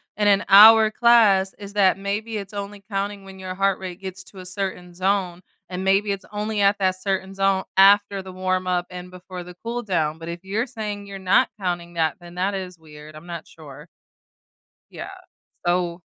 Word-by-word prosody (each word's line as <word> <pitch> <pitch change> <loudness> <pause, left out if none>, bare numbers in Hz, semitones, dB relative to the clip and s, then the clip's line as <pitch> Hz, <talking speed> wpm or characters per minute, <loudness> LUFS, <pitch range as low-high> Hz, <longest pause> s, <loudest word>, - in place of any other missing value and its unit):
in 210 0 +2
an 200 0 +3
hour 215 +2 +9
class 215 -5 +4
is 200 -1 -9
that 195 -3 +3
maybe 210 +3 -3
it's 200 0 -7
only 200 0 -6
counting 200 0 -3
when 190 0 -12
your 185 -1 -6
heart 195 0 +1
rate 185 -1 -8
gets 190 -1 -7
to 195 - -16
a 185 - -9
certain 185 -2 -5
zone, 185 -1 -1 0.3
and 185 0 -4
maybe 195 +2 +2
it's 195 0 -4
only 210 +1 -3
at 200 +1 +4
that 185 -1 0
certain 190 0 -2
zone 195 -1 +1
after 200 0 +5
the 190 0 -10
warm 185 0 -2
up 180 -1 0
and 180 0 -9
before 180 0 -9
the 180 0 -12
cool 235 +1 -3
down, 160 -6 -1
but 165 +1 -8
if 170 +1 -7
you're 210 +5 -1
saying 210 -5 -6
you're 200 -1 -8
not 190 0 +3
counting 175 -2 -3
that, 160 -3 +1
then 175 0 -12
that 190 +3 -1
is 185 -2 -6
weird. 155 -1 -13
I'm 155 +2 -12
not 170 -2 -7
sure. 150 -4 -13 1.0
Yeah, - - -7 0.6
so 175 0 0
190 Hz, 195 wpm, -23 LUFS, 180-200 Hz, 1.0 s, hour